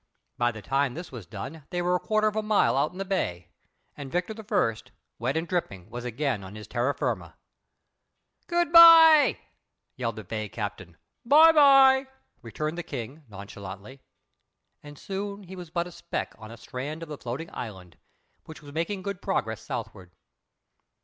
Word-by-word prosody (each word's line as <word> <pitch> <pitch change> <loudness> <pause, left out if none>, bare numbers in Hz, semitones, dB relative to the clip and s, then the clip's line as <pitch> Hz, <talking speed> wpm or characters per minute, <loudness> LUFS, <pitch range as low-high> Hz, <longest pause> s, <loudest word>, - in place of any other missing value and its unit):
By 120 0 +1
the 110 -2 -10
time 135 -2 0
this 175 +2 -8
was 120 -7 -9
done 135 +9 -8
they 175 - -3
were 175 +1 +1
a 180 - +2
quarter 215 +2 +1
of 215 - -2
a 215 - +1
mile 210 - +2
out 140 +3 +1
in 180 - -13
the 195 - -4
bay, 90 - -3 0.4
and 140 -2 -8
Victor 180 +5 -2
I., 210 - 0 0.4
wet 130 +6 -1
and 165 +1 -2
dripping, 105 - -4
was 120 +1 -6
again 125 -3 -2
on 95 +2 -10
his 105 -1 -9
terra 125 +5 -1
firma. - - -3 1.1
"Goodbye," 330 -2 +8 0.6
yelled 115 -3 -3
the 110 - -8
bay 110 +1 -5
captain. 100 -6 -6 0.3
"Bye 310 +6 +7
bye," 270 -3 +6 0.3
returned 155 +8 -4
the - - -1
King, 140 +1 -7
nonchalantly. 100 +4 -10 0.8
And 145 -1 -12
soon 200 +2 -5
he 190 0 -10
was 180 -3 -9
but 170 +1 -2
a 175 - -10
speck 170 0 -5
on 110 0 -10
the 115 - -10
strand 135 +7 -6
of 165 - -10
the 150 - -7
floating 130 +7 -6
island, 95 -7 -8 0.5
which 155 -1 -12
was 145 -1 -12
making 185 +5 -3
good 200 -2 -5
progress 110 - -2
southward. 90 -1 -7
150 Hz, 170 wpm, -26 LUFS, -, 1.1 s, Goodbye